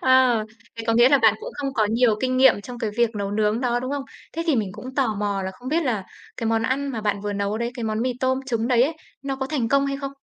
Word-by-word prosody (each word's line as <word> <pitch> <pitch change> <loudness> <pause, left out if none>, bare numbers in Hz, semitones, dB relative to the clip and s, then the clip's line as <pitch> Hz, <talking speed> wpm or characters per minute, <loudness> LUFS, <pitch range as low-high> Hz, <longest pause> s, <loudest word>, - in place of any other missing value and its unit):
Ờ, 255 -4 +4 0.3
thế 225 - -5
có 225 - +3
nghĩa 240 +2 +6
là 280 -1 +5
bạn 220 -3 +5
cũng - - -6
không 275 -2 -3
có 215 -2 +2
nhiều 230 -2 +3
kinh 255 0 0
nghiệm 260 -5 +5
trong 245 +3 -9
cái 220 -2 -2
việc 235 -2 +3
nấu 200 -1 -2
nướng 215 +2 +1
đó, 245 -1 0
đúng 255 +2 -4
không? 285 -1 -2 0.3
Thế 330 - -2
thì 300 -6 +3
mình 210 -4 0
cũng 255 +5 -9
tò 250 -6 +1
mò 200 -1 -1
là 190 - -3
không 250 +1 -9
biết 330 +3 +1
là 220 -7 -1 0.3
cái 230 - -3
món 225 0 +1
ăn 275 +4 -1
mà 235 -5 -3
bạn 205 -2 -1
vừa 205 0 -3
nấu 200 +2 -2
đấy, 235 0 -2
cái 240 -3 -4
món 215 0 -1
mì 255 0 0
tôm 260 0 +1
trứng 230 -1 -1
đấy 245 -1 +4
ấy, 310 +4 0 0.3
nó 270 -1 -3
có 265 0 -3
thành 265 -6 -1
công 275 0 +3
hay 275 0 -2
không? 275 -1 -5
240 Hz, 300 wpm, -23 LUFS, 215-265 Hz, 0.3 s, nghĩa